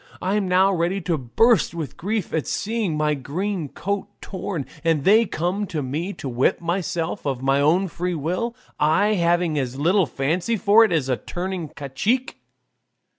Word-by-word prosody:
I'm 195 +1 0
now 190 +2 +4
ready 175 +2 0
to 170 -1 0
burst 170 - +2
with 160 -4 -5
grief 205 +1 -3
at 160 - -1
seeing 215 -7 -1
my 150 0 +2
green 160 +4 -3
coat 200 +5 -3
torn, 185 -6 -5 0.2
and 165 -4 +2
they 220 +5 +5
come 185 +6 -2
to 170 - -5
ask 145 - -1
me 155 +9 -3
to 140 - -7
whip 125 0 +1
myself 170 0 -2
of 130 -2 -2
my 135 +1 +3
own 175 +7 +3
free 180 +1 -3
will, 180 +10 -2 0.2
I 160 +8 +3
having 170 -4 +1
as 130 -1 -3
little 175 +4 +3
fancy 165 - -1
for 210 +3 +6
it 220 - +2
as 160 -6 +1
for 130 -2 0
turning 180 -2 -4
cacique." 195 - -2
175 Hz, 175 wpm, -23 LUFS, 150-195 Hz, 0.2 s, for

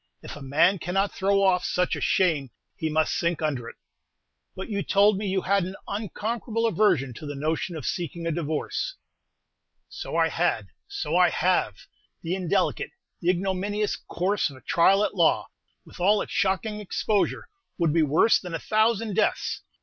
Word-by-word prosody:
If - - -8
a 145 - -10
man 165 +8 +3
cannot 195 +5 0
throw 195 0 +2
off 180 -2 +3
such 180 0 0
a - - -6
shame, 160 -8 +2 0.3
he 160 - -2
must 155 0 +1
sink 170 -1 0
under 135 -6 -2
it." - - -13 0.8
"But 190 - -6
you 200 -3 -2
told 200 +2 +4
me 205 +1 -3
you 190 -1 0
had 200 0 +2
an 185 +2 -5
unconquerable 225 +2 -3
aversion 190 - +2
to 150 +6 -9
the 145 - -5
notion 155 +4 -2
of 150 -6 -6
seeking 170 -1 -3
a 165 - 0
divorce." 160 - -2 0.9
"So - - -6
I - - +3
had; - - 0 0.2
so 400 0 -3
I - - +5
have! - - +1 0.5
The 170 +1 -2
indelicate, 185 0 0 0.3
the 175 - 0
ignominious 195 +3 0
course 185 +2 -1
of 140 - -12
a 130 - -15
trial 190 +9 +4
at - - -1
law, - - +2 0.4
with - - -14
all 205 +4 +3
its - - -11
shocking 205 +3 0
exposure, 210 0 -1 0.3
would 165 -4 +1
be 165 - +3
worse 155 +9 +4
than 180 -3 -6
a - - -3
thousand 220 0 +1
deaths! 220 - 0
185 Hz, 175 wpm, -26 LUFS, 165-205 Hz, 0.9 s, I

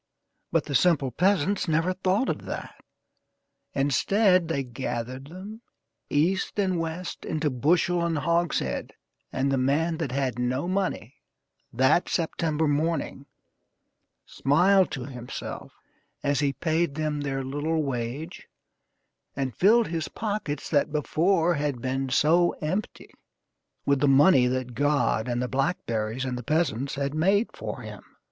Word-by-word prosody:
But - - +1
the 140 - -5
simple 145 -4 +3
peasants 190 - +1
never 165 +3 +1
thought 190 +6 +1
of - - -3
that. - - -6 1.0
Instead, 180 - +3
they 140 -4 -1
gathered 130 +1 -5
them, 195 +7 -9 0.5
east 175 +9 +1
and 185 -4 +1
west, 165 +2 -5
into 155 -2 -1
bushel 170 +6 +2
and 170 -2 0
hogshead, 170 +2 -1 0.4
and 135 +1 0
the 135 - +1
man 155 +6 +1
that 155 -6 -2
had 130 -3 -1
no 130 +6 -1
money, 185 - -2 0.5
that 130 +8 +3
September 160 -2 0
morning, 145 -2 -1 1.0
smiled 185 +7 +3
to 130 -2 -5
himself 125 -3 -7 0.5
as 140 -1 +1
he 145 -2 +2
paid 160 -2 0
them 155 -1 -2
their 135 -1 -2
little 150 +4 -1
wage, 135 +5 -4 0.9
and 135 -3 -3
filled 225 +4 +4
his 165 -1 -2
pockets, 205 -10 -3
that 145 0 +1
before 165 +3 +2
had 145 -4 -2
been 130 +2 -2
so 165 +6 +3
empty, 185 +7 -4 0.7
with 140 -1 +2
the 145 - +3
money 135 -1 +6
that 125 -1 -2
God 145 -4 +1
and 120 0 -1
the - - -1
blackberries 125 -4 -1
and 125 -1 -3
the - - -7
peasants 140 -3 0
had 140 0 -2
made 195 +8 +2
for - - -6
him. - - -9
150 Hz, 135 wpm, -26 LUFS, 135-175 Hz, 1.0 s, money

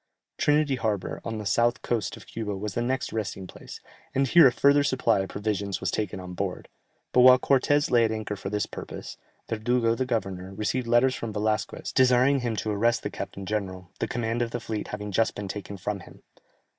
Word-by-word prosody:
Trinity 145 -2 +2
Harbour, 105 -5 -2
on 115 -1 -4
the 105 - -6
south 120 +5 +2
coast 115 -6 -2
of - - -13
Cuba 105 -3 -4
was 105 0 -4
the 120 - -1
next 130 +2 -2
resting 100 -3 -3
place, - - -11 0.4
and 135 +1 +3
here 165 +2 +8
a - - +4
further 140 +4 +4
supply 125 -6 +2
of 95 - -2
provisions 100 -1 -2
was 95 0 -1
taken 105 -3 -2
on 90 0 -8
board, 95 0 -4 0.4
but - - +3
while 130 0 +9
Cortès 140 +3 +2
lay 120 -1 +5
at 110 - +1
anchor 110 -1 -3
for 95 0 -6
this 105 0 -1
purpose, - - -8 0.3
Verdugo 115 +1 +1
the 130 +2 -2
governor, 95 -5 -3
received 115 +4 -1
letters 120 +3 +4
from 115 -3 -4
Velasquez, 105 +1 -2
desiring 130 +2 +4
him 120 -3 -2
to 110 0 -2
arrest 115 +3 +1
the - - -3
captain 100 - -6
general, 95 -3 -4
the - - -1
command 115 0 -2
of 120 - 0
the 120 - -4
fleet 110 -2 -4
having 105 0 -5
been - - -6
just 115 +3 +1
taken 100 0 -6
from 100 +2 -3
him. - - -15
110 Hz, 205 wpm, -26 LUFS, 100-125 Hz, 0.4 s, while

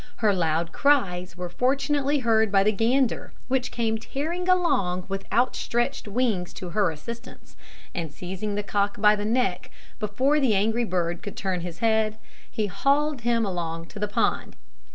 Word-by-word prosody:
Her 215 -3 +2
loud 165 -2 0
cries 185 -11 +1
were 180 0 -4
fortunately 275 +8 +1
heard 220 -2 +3
by 195 -1 +5
the 210 - +3
gander, 235 +4 +1 0.2
which 255 -1 +1
came 225 -2 -1
tearing 335 +10 -3
along 195 - +2
with 195 0 -5
outstretched 240 0 0
wings 205 -5 0
to 180 - -7
her 200 +1 +2
assistance, 195 +10 -9 0.4
and 165 -4 -4
seizing 190 +6 -4
the 205 - -1
cock 205 0 -1
by 210 0 +6
the 205 0 -3
neck, 215 -6 0 0.3
before 255 +8 +1
the 255 -7 +3
angry 225 +4 +2
bird 175 -3 -1
could 205 - -7
turn 190 -2 -1
his 170 -1 -6
head, 220 -1 +2 0.3
he 215 - -1
hauled 275 +8 +1
him 230 -1 +2
along 165 -3 -3
to - - -9
the 210 - 0
pond. 205 - 0
210 Hz, 165 wpm, -25 LUFS, 185-250 Hz, 0.4 s, by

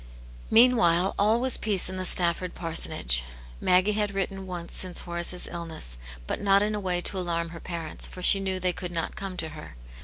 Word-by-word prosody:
Meanwhile 195 -7 +4
all 215 +3 +3
was 255 0 +1
peace 205 -4 +4
in 185 0 -3
the 185 - -3
Stafford 175 0 +1
parsonage; 60 - 0 0.4
Maggie 185 +3 +3
had 210 -1 -2
written 195 0 -3
once 175 -2 -4
since 185 -2 +2
Horace's 175 +1 -2
illness, 160 - -5 0.3
but - - -4
not 200 0 +3
in 210 +1 -1
a 210 - -2
way 180 -3 -1
to 190 - +1
alarm 170 -2 -2
her 165 0 -10
parents, 165 -3 -4
for 180 - -10
she 195 - +7
knew 190 -1 -2
they 180 -1 0
could 180 0 -6
not 165 -1 -3
come 195 -2 -6
to 160 -2 -3
her. 150 - -11
180 Hz, 195 wpm, -26 LUFS, 170-195 Hz, 0.4 s, she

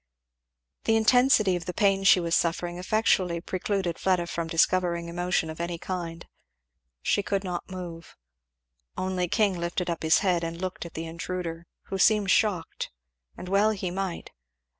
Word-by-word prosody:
The 225 - +3
intensity 225 -3 +4
of 175 - -4
the 180 - -5
pain 195 -2 +2
she 195 -1 +7
was 170 -1 -2
suffering 175 +1 0
effectually 185 -3 +1
precluded 185 0 -2
Fleda 185 -2 +1
from 170 -1 -3
discovering 170 +1 +1
emotion 175 -1 0
of 160 +1 -6
any 170 0 -3
kind. 170 -1 -5 0.8
She - - +2
could 200 0 -1
not 180 -1 -4
move. 175 -3 -8 0.8
Only 185 -1 -1
King 200 -1 +1
lifted 170 +1 -2
up 170 - -4
his 160 0 +4
head 175 -3 +2
and 165 0 -4
looked 185 -2 -4
at - - -16
the 165 - -4
intruder, 170 0 -5 0.2
who 195 - -5
seemed 205 0 +4
shocked, 200 -7 +1 0.5
and 180 - -8
well 200 +3 +3
he 190 -4 -2
might. 190 -1 -4
180 Hz, 160 wpm, -27 LUFS, 170-195 Hz, 0.8 s, she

